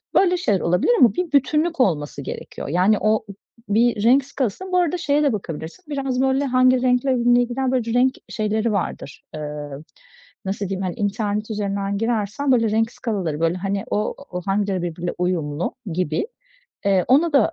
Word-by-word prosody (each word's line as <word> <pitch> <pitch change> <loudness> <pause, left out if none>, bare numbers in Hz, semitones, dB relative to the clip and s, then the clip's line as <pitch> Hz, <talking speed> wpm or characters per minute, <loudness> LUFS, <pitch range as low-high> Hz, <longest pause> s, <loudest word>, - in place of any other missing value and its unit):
Böyle 360 -2 +4
şeyler 205 - +1
olabilir 180 - +2
ama 235 -6 +6
bir 355 -3 -2
bütünlük 300 +3 +2
olması 150 - 0
gerekiyor. - - -7
Yani, 185 +7 +3
o 215 0 +3
o 215 - -13 0.5
bir 230 -2 +2
renk 255 +4 +5
skalası. 275 - -3
Bu 365 - +2
arada 355 0 +2
şeye 295 -3 +1
de 280 - +2
bakabilirsin 170 - -6
biraz, 270 -3 -1
böyle, 265 +1 +2
"Hangi 255 -1 +4
renkle 255 +1 +2
ne 245 0 +4
gider?" 250 +2 -1
Böyle 235 -3 0
renk 255 +2 +3
şeyleri 215 +1 -1
vardır, 155 -7 -4
ııı, 150 -1 -6 0.6
nasıl 195 0 -3
diyeyim, 195 0 -3
hani, 185 -2 -3
internet 210 +1 -2
üzerinden 200 -1 -2
girersen, 225 +4 -1
böyle, 230 -4 +3
renk 225 +1 +1
skalaları, 190 - -3
böyle, 165 +2 +1
hani, 195 +1 -2
o 210 +1 -1 0.2
o 180 0 -4
hangileri 195 -1 0
birbiriyle 175 0 -3
uyumlu 170 -3 -1 0.2
gibi, 170 - -1 0.6
eee, 190 -3 +3
ona 310 +6 +4
da 285 +4 +4
215 Hz, 170 wpm, -22 LUFS, 185-260 Hz, 0.6 s, ama